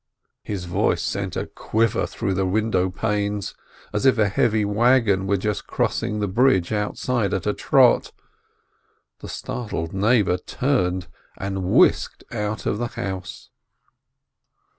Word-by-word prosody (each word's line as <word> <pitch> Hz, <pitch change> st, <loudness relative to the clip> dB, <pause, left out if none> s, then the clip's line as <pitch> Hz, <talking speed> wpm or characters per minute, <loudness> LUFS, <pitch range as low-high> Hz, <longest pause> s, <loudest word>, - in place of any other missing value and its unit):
His 95 Hz, -4 st, -5 dB
voice 85 Hz, -, 0 dB
sent -, -, -3 dB
a -, -, -2 dB
quiver 115 Hz, 0 st, 0 dB
through 95 Hz, -, -2 dB
the 95 Hz, 0 st, 0 dB
window 95 Hz, -2 st, +1 dB
panes, 105 Hz, 0 st, -2 dB, 0.4 s
as 105 Hz, -, -1 dB
if 135 Hz, -2 st, +4 dB
a 105 Hz, -2 st, +3 dB
heavy 110 Hz, +1 st, +2 dB
wagon 105 Hz, -2 st, +3 dB
were 100 Hz, +1 st, +2 dB
just 105 Hz, +1 st, -3 dB
crossing 105 Hz, -, -1 dB
the 105 Hz, -, 0 dB
bridge 105 Hz, -3 st, +2 dB
outside 105 Hz, 0 st, -1 dB
at 95 Hz, -, -3 dB
a -, -, +1 dB
trot, -, -, +3 dB, 1.1 s
the -, -, -9 dB
startled 105 Hz, -9 st, -4 dB
neighbor 100 Hz, -2 st, +2 dB
turned, 95 Hz, -, -1 dB, 0.3 s
and 95 Hz, -1 st, -3 dB
whisked 90 Hz, -, +3 dB
out 105 Hz, -1 st, -3 dB
of 105 Hz, -, -1 dB
the 120 Hz, -, -1 dB
house. 95 Hz, -4 st, -6 dB
105 Hz, 135 wpm, -23 LUFS, 95-110 Hz, 1.1 s, if